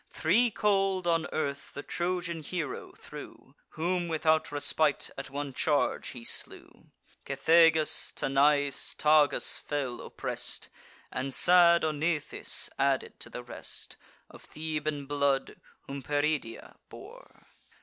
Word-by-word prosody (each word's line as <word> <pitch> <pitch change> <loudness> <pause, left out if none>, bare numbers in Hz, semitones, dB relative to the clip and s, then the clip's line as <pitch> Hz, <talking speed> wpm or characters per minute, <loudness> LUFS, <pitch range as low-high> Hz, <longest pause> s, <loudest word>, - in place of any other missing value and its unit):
Three 220 +10 +2
cold 195 -3 +1
on 165 -1 +1
earth 140 -2 -3
the 145 - -6
Trojan 175 -1 -2
hero 160 0 -4
threw, - - -12 0.2
Whom 175 +2 0
without 160 -1 +1
respite 145 +1 +1
at - - -7
one 140 0 -5
charge 145 +2 0
he 120 -3 -8
slew: - - -6 0.3
Cethegus, 160 -2 +3
Tanais, 140 +1 +2
Tagus, 150 -2 +4
fell 135 -5 -3
oppress'd, - - -3 0.4
And 135 +2 -3
sad 175 -1 +6
Onythes, 155 0 -1
added 135 -1 0
to - - -8
the 125 - -7
rest, 120 - -7 0.3
Of - - -15
Theban 155 -2 -4
blood, 140 -1 0 0.2
whom 140 0 -7
Peridia 145 -4 -2
bore. - - -14
155 Hz, 115 wpm, -29 LUFS, 140-170 Hz, 0.4 s, sad